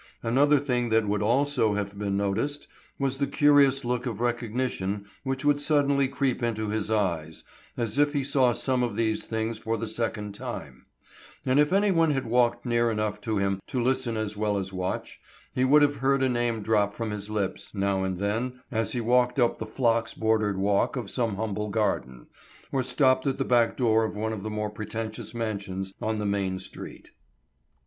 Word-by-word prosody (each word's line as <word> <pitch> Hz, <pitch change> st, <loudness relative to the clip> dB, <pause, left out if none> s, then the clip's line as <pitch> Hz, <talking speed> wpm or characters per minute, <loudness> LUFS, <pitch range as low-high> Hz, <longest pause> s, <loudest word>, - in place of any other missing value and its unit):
Another 140 Hz, +6 st, +4 dB
thing 125 Hz, -4 st, 0 dB
that 110 Hz, -1 st, +2 dB
would 105 Hz, 0 st, 0 dB
also 120 Hz, -1 st, +2 dB
have 100 Hz, -1 st, -3 dB
been 100 Hz, -1 st, -2 dB
noticed 100 Hz, +9 st, -1 dB, 0.3 s
was 135 Hz, -1 st, -1 dB
the 140 Hz, -, +1 dB
curious 140 Hz, -2 st, +4 dB
look 125 Hz, +1 st, -1 dB
of 115 Hz, -4 st, -4 dB
recognition 120 Hz, -4 st, -2 dB, 0.2 s
which 135 Hz, +1 st, -3 dB
would 145 Hz, 0 st, +4 dB
suddenly 140 Hz, -2 st, +3 dB
creep 135 Hz, -1 st, -1 dB
into 110 Hz, -2 st, -1 dB
his 105 Hz, 0 st, -2 dB
eyes, 85 Hz, -7 st, -1 dB, 0.3 s
as 120 Hz, +2 st, -1 dB
if 145 Hz, 0 st, +4 dB
he 140 Hz, -2 st, 0 dB
saw 135 Hz, -2 st, +3 dB
some 130 Hz, +1 st, 0 dB
of 120 Hz, -4 st, -1 dB
these 110 Hz, -1 st, 0 dB
things 110 Hz, 0 st, -2 dB
for 115 Hz, 0 st, -2 dB
the 115 Hz, -, -4 dB
second 105 Hz, -3 st, -3 dB
time; 70 Hz, -9 st, -7 dB, 0.6 s
and 130 Hz, +2 st, +3 dB
if 150 Hz, +2 st, +3 dB
anyone 190 Hz, -5 st, +3 dB
had 135 Hz, -3 st, 0 dB
walked 120 Hz, +1 st, +2 dB
near 120 Hz, -1 st, +2 dB
enough 105 Hz, -1 st, -2 dB
to 110 Hz, 0 st, -1 dB
him 100 Hz, -1 st, 0 dB
to 130 Hz, -, -2 dB
listen 120 Hz, -2 st, 0 dB
as 105 Hz, -1 st, -2 dB
well 105 Hz, -1 st, 0 dB
as 95 Hz, 0 st, -4 dB
watch, 95 Hz, 0 st, -4 dB, 0.3 s
he 130 Hz, -, +1 dB
would 145 Hz, +3 st, +6 dB
have 145 Hz, 0 st, +2 dB
heard 135 Hz, +1 st, +2 dB
a 130 Hz, -, +3 dB
name 120 Hz, -3 st, 0 dB
drop 105 Hz, -1 st, +1 dB
from 115 Hz, -2 st, -3 dB
his 105 Hz, 0 st, -5 dB
lips 105 Hz, -1 st, -3 dB
now 100 Hz, -1 st, 0 dB
and 95 Hz, -1 st, -2 dB
then 115 Hz, +6 st, -2 dB
as 110 Hz, -2 st, 0 dB
he 120 Hz, -, -1 dB
walked 125 Hz, +2 st, +2 dB
up 120 Hz, -1 st, +2 dB
the 110 Hz, -, -4 dB
phlox 115 Hz, 0 st, 0 dB
bordered 110 Hz, -3 st, +1 dB
walk 100 Hz, +5 st, +1 dB
of 120 Hz, -7 st, -4 dB
some 115 Hz, -5 st, 0 dB
humble 105 Hz, 0 st, -3 dB
garden, 65 Hz, -, -1 dB, 0.5 s
or 135 Hz, -, +1 dB
stopped 130 Hz, 0 st, +2 dB
at 135 Hz, -, 0 dB
the -, -, -1 dB
back 120 Hz, -2 st, +3 dB
door 115 Hz, -3 st, +3 dB
of 110 Hz, -, -3 dB
one 110 Hz, +1 st, -2 dB
of 105 Hz, -, -5 dB
the 110 Hz, -, -4 dB
more 105 Hz, 0 st, -3 dB
pretentious 110 Hz, +2 st, -5 dB
mansions 100 Hz, -4 st, -3 dB
on 110 Hz, 0 st, -1 dB
the 105 Hz, -, -2 dB
main 100 Hz, -2 st, 0 dB
street. 95 Hz, -, -10 dB
115 Hz, 195 wpm, -27 LUFS, 105-130 Hz, 0.6 s, would